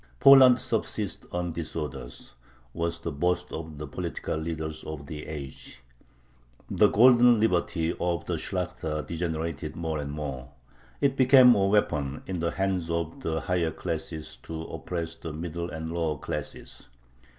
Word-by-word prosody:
"Poland 130 Hz, -, +8 dB
subsists -, -, -2 dB
on 90 Hz, 0 st, -2 dB
disorders," 75 Hz, -6 st, -6 dB, 0.4 s
was 85 Hz, 0 st, -2 dB
the -, -, -4 dB
boast 90 Hz, +5 st, -1 dB
of 80 Hz, -2 st, -6 dB
the 75 Hz, -, -5 dB
political 85 Hz, -3 st, -4 dB
leaders 80 Hz, -1 st, -4 dB
of 75 Hz, -2 st, -7 dB
the 75 Hz, +1 st, -7 dB
age. 70 Hz, -4 st, -8 dB, 0.9 s
The -, -, +5 dB
"golden 120 Hz, 0 st, +6 dB
liberty" 85 Hz, -5 st, +1 dB
of 85 Hz, -1 st, -1 dB
the 90 Hz, -, -2 dB
Shlakhta 85 Hz, -3 st, -3 dB
degenerated 80 Hz, -3 st, -3 dB
more 80 Hz, -2 st, -2 dB
and 70 Hz, -1 st, -4 dB
more. 70 Hz, -4 st, -5 dB, 0.5 s
It 140 Hz, -2 st, +3 dB
became 130 Hz, -1 st, +8 dB
a 100 Hz, -3 st, +2 dB
weapon 75 Hz, -9 st, +1 dB
in 95 Hz, -2 st, -3 dB
the 85 Hz, +1 st, 0 dB
hands 95 Hz, -3 st, -1 dB
of 85 Hz, -1 st, -2 dB
the 80 Hz, 0 st, -1 dB
higher 90 Hz, -3 st, 0 dB
classes 80 Hz, 0 st, -5 dB
to 80 Hz, -1 st, -7 dB
oppress 80 Hz, +1 st, -4 dB
the 80 Hz, -1 st, -7 dB
middle 85 Hz, +2 st, -4 dB
and 80 Hz, 0 st, -5 dB
the -, -, -4 dB
lower 80 Hz, -3 st, -1 dB
classes. -, -, -6 dB
80 Hz, 150 wpm, -27 LUFS, 75-90 Hz, 0.9 s, Poland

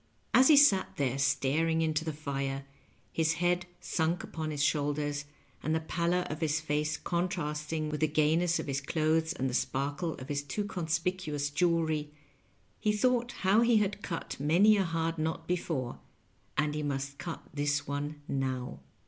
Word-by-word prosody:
Ab 260 Hz, -, +7 dB
he 305 Hz, -, +7 dB
sat 210 Hz, -10 st, +5 dB
there 135 Hz, -1 st, 0 dB
staring 150 Hz, +4 st, +2 dB
into 155 Hz, 0 st, 0 dB
the 160 Hz, -, -2 dB
fire, 140 Hz, -2 st, -3 dB, 0.5 s
his 160 Hz, -1 st, +2 dB
head 175 Hz, +1 st, +1 dB, 0.2 s
snnk 165 Hz, +1 st, 0 dB
npon 160 Hz, -1 st, -3 dB
his 145 Hz, -2 st, -1 dB
shoulders, 145 Hz, 0 st, 0 dB, 0.4 s
and 155 Hz, +1 st, 0 dB
the -, -, +2 dB
pallor 170 Hz, +2 st, 0 dB
of 155 Hz, 0 st, -5 dB
his 160 Hz, 0 st, +1 dB
face 150 Hz, -1 st, -1 dB
con 175 Hz, +1 st, -1 dB
trasting 155 Hz, -3 st, -3 dB
with 150 Hz, -, -2 dB
the 155 Hz, -, +3 dB
gajness 160 Hz, +3 st, +2 dB
of -, -, -3 dB
his 140 Hz, -1 st, -2 dB
clothes 160 Hz, +2 st, +1 dB
and 135 Hz, -, -1 dB
the 125 Hz, -, -3 dB
sparkle 145 Hz, +6 st, -1 dB
of 130 Hz, -, -9 dB
his 145 Hz, -1 st, 0 dB
too 145 Hz, +9 st, -3 dB
conspicuous 165 Hz, -4 st, -2 dB
jewelry, 160 Hz, -2 st, +1 dB, 0.7 s
he 215 Hz, -, +2 dB
thought 240 Hz, +3 st, +1 dB
how 195 Hz, +4 st, +5 dB
he 235 Hz, -1 st, +5 dB
had 205 Hz, -1 st, 0 dB
cut 165 Hz, -8 st, -5 dB
many 175 Hz, +9 st, +5 dB
a 200 Hz, -, +2 dB
hard 165 Hz, 0 st, -1 dB
knot 160 Hz, +1 st, -2 dB
before, 160 Hz, -8 st, -2 dB, 0.6 s
as 150 Hz, -1 st, +1 dB
he 150 Hz, -, -2 dB
must 140 Hz, -1 st, -3 dB
cut 175 Hz, -1 st, -5 dB
this 145 Hz, -1 st, 0 dB
one 145 Hz, +1 st, -4 dB
now. 130 Hz, -, -2 dB
155 Hz, 170 wpm, -30 LUFS, 145-170 Hz, 0.7 s, Ab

